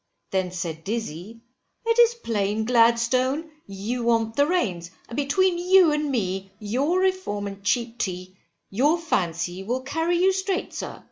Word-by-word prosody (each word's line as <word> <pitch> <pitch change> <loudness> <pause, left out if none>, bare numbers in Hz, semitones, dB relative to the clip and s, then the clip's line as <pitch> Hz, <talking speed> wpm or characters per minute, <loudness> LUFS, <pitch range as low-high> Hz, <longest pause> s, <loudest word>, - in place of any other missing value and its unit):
Then 185 -2 0
said 170 -3 -5
Dizzy 220 0 -5 0.4
it 460 +1 +2
is 475 0 +6
plain, 220 - -1
Gladstone, 250 +6 +2 0.2
you 205 +5 -4
want 230 -1 +1
the 285 +1 +3
reins, 185 - -1 0.2
and 235 - -8
between 345 +6 +2
you 365 -2 +5
and 300 0 0
me, 195 -6 -2
your 260 - 0
Reform 375 - -1
and 200 0 -7
cheap 235 +2 -1
tea, 185 0 -4 0.4
you 285 - +3
fancy 175 - -2
will 245 +6 -2
carry 325 +5 0
you 380 +2 +4
straight, 380 0 -2
sir. - - -6
235 Hz, 150 wpm, -24 LUFS, 195-325 Hz, 0.4 s, is